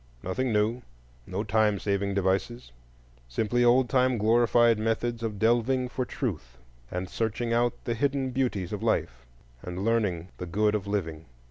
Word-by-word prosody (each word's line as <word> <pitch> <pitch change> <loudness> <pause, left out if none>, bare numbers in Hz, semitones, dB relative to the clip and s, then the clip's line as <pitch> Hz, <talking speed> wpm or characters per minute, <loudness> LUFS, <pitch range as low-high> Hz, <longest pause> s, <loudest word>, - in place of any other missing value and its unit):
Nothing 120 +7 -1
new, 110 +3 +1 0.5
no 95 +3 -3
time 105 -1 +2
saving 100 0 -1
devices,—simply 65 - -2
old 120 +1 +5
time 130 0 +2
glorified 115 +1 +4
methods 115 +1 -1
of 110 -3 -3
delving 120 +4 +2
for 130 0 -2
Truth, 75 - -4 0.3
and 90 +1 -4
searching 115 +3 -2
out 120 0 +2
the 120 - -1
hidden 135 +2 0
beauties 120 -9 -1
of - - -4
life, - - -1 0.3
and 90 +2 -5
learning 100 -7 0
the 90 - -5
good 105 +4 +1
of 105 -2 -2
living. 80 -6 -3
110 Hz, 145 wpm, -27 LUFS, 95-120 Hz, 0.5 s, old